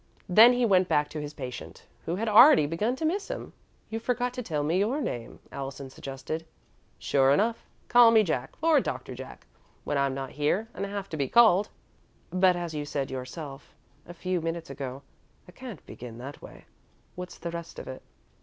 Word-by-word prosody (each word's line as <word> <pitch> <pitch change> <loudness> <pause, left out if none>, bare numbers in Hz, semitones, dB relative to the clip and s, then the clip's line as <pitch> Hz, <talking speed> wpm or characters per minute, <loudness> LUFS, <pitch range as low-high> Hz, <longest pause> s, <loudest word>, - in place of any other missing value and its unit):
Then 220 +7 +8
he 245 0 +2
went 185 -4 +4
back 150 -3 +1
to 155 - -5
his 150 0 -7
patient, 130 -3 -8 0.2
who 170 - 0
had 225 +4 -2
already 225 - +8
begun 205 - -1
to 315 - -3
miss 390 +6 -1
him. - - -6 0.4
"You 225 - -2
forgot 245 +1 -1
to 250 - -4
tell 155 -10 -2
me 165 +5 +1
your 230 +9 +1
name," 120 - -4
Allison 135 0 -6
suggested. 135 +5 -6 0.5
"Sure 135 -1 +2
enough. 220 +11 +2 0.2
Call 240 -1 +7
me 225 -1 +6
Jack, 155 -9 -2
or 320 -3 +5
Doctor - - -4
Jack, - - -10 0.4
when 145 -1 -1
I'm 140 -1 +1
not 135 -1 -5
here 150 +10 0
and 200 +1 -4
have 200 -1 -5
to 155 - -5
be 140 -2 0
called." 210 -4 +5 0.6
"But, 185 0 +4
as 175 -2 -4
you 150 -1 -3
said 140 -2 -3
yourself 135 +2 -7 0.3
a 175 - -8
few 185 0 -2
minutes 165 0 -4
ago, 135 -1 -6 0.4
I - - -13
can't 240 - -10
begin 115 -2 -9
that 135 +4 -9
way. - - -13 0.5
What's 180 0 -8
the 170 - -5
rest 170 0 -7
of - - -8
it?" 130 - -7
170 Hz, 190 wpm, -28 LUFS, 140-220 Hz, 0.6 s, Then